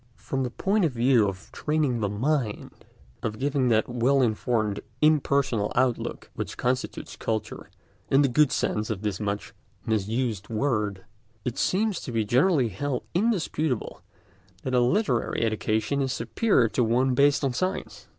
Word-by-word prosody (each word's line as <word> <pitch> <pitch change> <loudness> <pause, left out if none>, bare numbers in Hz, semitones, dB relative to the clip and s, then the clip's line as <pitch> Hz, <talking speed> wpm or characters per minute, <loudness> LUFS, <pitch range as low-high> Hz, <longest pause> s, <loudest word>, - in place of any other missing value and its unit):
From 135 - -3
the 125 - -1
point 195 - 0
of 155 -6 +1
view 120 -2 +4
of 95 0 -10
training 150 -5 0
the 105 -2 0
mind, 120 +1 -2 0.4
of 110 -2 -3
giving 140 0 +1
that 110 -2 +3
well 125 +3 +2
informed, 110 -2 0 0.2
impersonal 140 -7 +2
outlook 125 -1 -1
which - - -5
constitutes 125 +1 -2
culture 110 -1 -4 0.4
in 135 +2 +5
the - - +4
good 145 +2 +3
sense 105 0 -1
of 110 -2 -3
this 105 -4 -2
much 105 -1 -3 0.3
misused 110 -1 -1
word, 105 -5 -1 0.4
it 125 0 -3
seems 205 -1 +1
to 125 - -7
be 115 -2 0
generally 130 - +3
held 125 +7 -3
indisputable 170 - -1 0.6
that 130 - -3
a 125 - +4
literary 125 - +1
education 110 +4 0
is 135 -1 0
superior 125 - +2
to 125 - +1
one 125 +3 +2
based 140 +3 +3
on 135 -2 +1
science. 185 +8 -3
125 Hz, 150 wpm, -26 LUFS, 110-140 Hz, 0.6 s, in